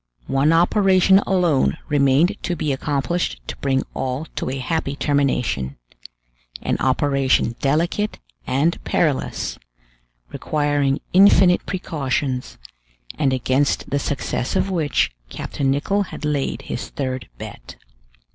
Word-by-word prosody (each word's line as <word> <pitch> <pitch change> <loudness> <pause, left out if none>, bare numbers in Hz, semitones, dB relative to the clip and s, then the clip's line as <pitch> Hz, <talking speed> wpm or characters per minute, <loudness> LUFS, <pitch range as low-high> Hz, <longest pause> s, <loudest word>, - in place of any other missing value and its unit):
One 135 +3 +2
operation 190 +2 +4
alone 175 -6 +2
remained 145 +3 +3
to 175 - -2
be 150 -3 -1
accomplished 140 - -1
to - - -6
bring 135 -1 0
all 130 +4 -3
to - - -2
a 135 - -3
happy 140 +1 -2
termination; 125 - 0 0.9
an - - 0
operation 135 -3 +2
delicate 170 +9 0 0.3
and 150 +6 +1
perilous, 150 -6 -1 0.7
requiring 145 -2 0
infinite 185 -1 +6
precautions, 140 -7 -2 0.6
and 135 - +2
against 130 +2 0
the 140 - +1
success 140 -3 -2
of 195 - +1
which 160 -5 +1 0.2
Captain 135 - -3
Nicholl 195 +9 +1
had - - -6
laid 145 -2 -1
his - - -5
third 130 - -4
bet. - - -9
145 Hz, 115 wpm, -21 LUFS, 135-170 Hz, 0.9 s, infinite